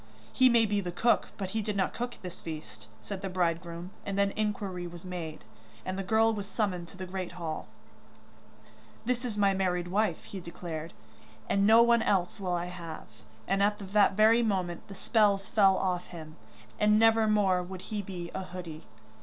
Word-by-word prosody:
'He 255 -1 +6
may 235 -2 +5
be 205 -1 0
the 180 -2 -4
cook, 230 +7 +2
but 190 -2 -4
he 220 - -1
did 210 -1 -3
not 190 - +1
cook 245 0 -4
this 180 -1 -8
feast,' 155 -10 -8 0.2
said 195 - -6
the 195 - -3
bridegroom, 170 0 -2
and 200 -1 -3
then 200 0 +3
inquiry 200 -4 -2
was 175 +1 -10
made, 170 -4 -6 0.4
and 185 - -2
the 195 - -2
girl 220 +3 +3
was 205 -2 -4
summoned 190 -6 -2
to 185 - -14
the 185 - -5
great 185 -1 -5
hall. 165 -3 -5 1.4
'That 250 +1 0
is 230 -4 -4
my 200 -1 +4
married 180 -2 0
wife,' 200 -2 0
he 195 - -7
declared, 170 -2 -6 0.5
'and 200 0 +3
no 225 +2 +8
one 235 -1 +4
else 195 -1 +1
will 185 -2 -2
I 175 0 -2
have,' 165 -10 -9 0.3
and 195 0 +1
at 205 +1 +3 0.2
that 210 -2 +5
very 220 +3 +5
moment 185 -6 -1
the 195 - -9
spells 200 -1 +2
fell 195 -3 +5
off 180 -2 -1
him, 160 -2 -10 0.4
and 210 0 +5
never 225 0 +5
more 200 -4 +3
would 185 0 -7
he 210 - -1
be 180 -3 -6
a - - -3
hoodie. 180 -4 -8
190 Hz, 190 wpm, -30 LUFS, 175-210 Hz, 1.4 s, no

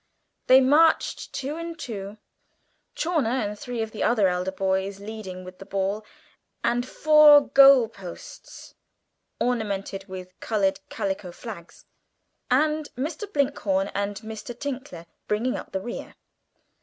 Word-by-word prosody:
They 260 +1 +8
marched 305 +5 +3
two 280 +4 -4
and 335 0 -6
two, 210 -7 -6 0.8
Chawner 265 -9 0
and 210 0 -8
three 240 -1 -3
of 220 - -6
the 215 - -7
other 215 -5 +3
elder 180 +1 -1
boys 190 +1 -1
leading 200 -3 -7
with 185 0 -11
the 195 - -10
ball 200 +2 -1 0.6
and 240 +1 +1
four 305 0 +7
goal 275 -3 +7
posts 195 -6 -11 0.7
ornamented 200 -5 -2
with 185 -1 -9
coloured 195 -3 0
calico 190 -2 -3
flags, 175 -3 -10 0.6
and 300 +3 +2
Mr. 310 +10 -4
Blinkhorn 215 - 0
and 200 +1 -2
Mr. 220 +2 -8
Tinkler 260 -11 -6 0.2
bringing 225 +5 0
up - - -7
the 190 - -3
rear. 240 +5 -7
220 Hz, 130 wpm, -25 LUFS, 195-270 Hz, 0.8 s, They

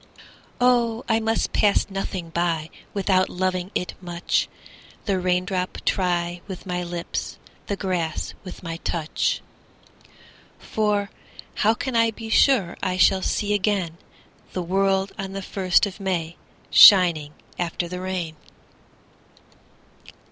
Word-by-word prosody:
Oh 240 -1 +2
I 225 -1 +2
must 225 0 0
pass 205 -1 +3
nothing 190 -3 -4
by 165 -2 -1 0.2
Without 190 -2 +2
loving 185 0 -1
it 180 - -2
much, 175 -1 -1 0.6
The 195 -2 +1
raindrop 180 0 -1
try 175 -2 0
with 190 -1 -8
my 180 -1 -2
lips, 175 -1 -4 0.3
The 200 - -1
grass 180 -5 -2
with 185 -1 -10
my 165 -1 -4
touch; 165 -1 -1 1.2
For 205 -2 -1 0.4
how 220 +2 +2
can 260 +1 -4
I 230 0 +4
be 225 0 -8
sure 220 -8 +4
I 185 0 -1
shall 190 +1 +4
see 210 +2 0
again 190 -5 0 0.5
The 180 - -2
world 195 +2 +1
on 195 0 -4
the 195 0 -5
first 190 +2 +2
of 200 0 -7
May 175 -4 -2 0.4
Shining 170 -7 +7 0.3
after 175 0 -2
the 180 +1 -6
rain? 180 -4 -4
185 Hz, 125 wpm, -24 LUFS, 175-200 Hz, 1.2 s, Shining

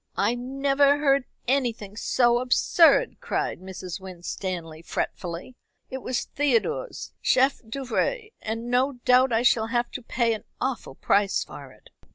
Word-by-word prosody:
"I 205 +4 +2
never 275 +3 +2
heard 275 -2 +2 0.2
anything 235 -6 -1
so 240 +2 +2
absurd," 325 - +4
cried - - -2
Mrs. 185 -1 -7
Winstanley 175 -3 -6
fretfully. 170 +5 -4 0.4
"It 260 - -4
was 255 0 -2
Theodore's 290 - -1
chef 265 +2 +3
d'oeuvre, 275 - -2
and 225 +2 -4
no 260 +3 +2
doubt 255 +1 +5
I 225 +1 +2
shall 225 -2 +3
have 240 +1 -1
to 255 - -6
pay 235 -1 0
an 215 - -6 0.2
awful 255 - -3
price 200 +5 +2
for - - -11
it." - - -20
245 Hz, 140 wpm, -25 LUFS, 210-275 Hz, 0.4 s, doubt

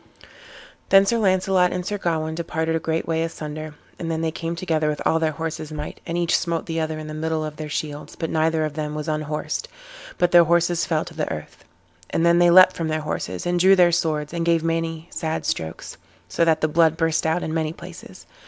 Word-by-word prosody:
Then 195 0 +7
Sir 230 +3 +1
Launcelot 185 -2 +3
and 180 -1 -3
Sir 205 +1 -3
Gawain 160 -3 -1
departed 160 0 -2
a - - +1
great 160 0 -2
way 165 -1 0
asunder, 155 -1 -5 0.2
and 165 - -4
then 160 0 -1
they 165 -1 0
came 165 +1 -4
together 160 -3 0
with 150 - -2
all 160 - +3
their 160 -1 0
horses' 160 -1 -5
might, 150 -1 -6
and 170 - -2
each 170 -1 +2
smote 170 -2 -1
the 165 0 -3
other 160 0 -2
in 155 - -7
the 155 - -7
middle 160 0 -2
of 150 -1 -7
their 155 -1 -6
shields, 150 0 -5
but 165 - -4
neither 160 0 +1
of 155 - -4
them 150 -1 -4
was 150 +1 -4
unhorsed, 155 -1 -3 0.5
but 175 0 +2
their 175 -1 +7
horses 170 +1 +2
fell 160 -1 0
to 175 - -10
the 155 -1 -3
earth. 75 - -8 0.4
And 165 - +1
then 170 0 +5
they 175 0 +6
leapt 185 +1 +7
from 165 - -2
their 155 0 -1
horses, 95 -11 -4
and 175 0 +1
drew 190 +2 +6
their 175 -2 +5
swords, 155 -2 -1
and 170 -1 -1
gave 165 -1 +2
many 165 0 -2
sad 160 -1 -3
strokes, 80 -1 -4 0.3
so 90 - 0
that 160 -1 +2
the 155 - +3
blood 160 0 +3
burst 165 -1 +1
out 160 +3 0
in 160 - -3
many 160 -1 -1
places. 170 - -12
160 Hz, 225 wpm, -23 LUFS, 155-170 Hz, 0.5 s, Then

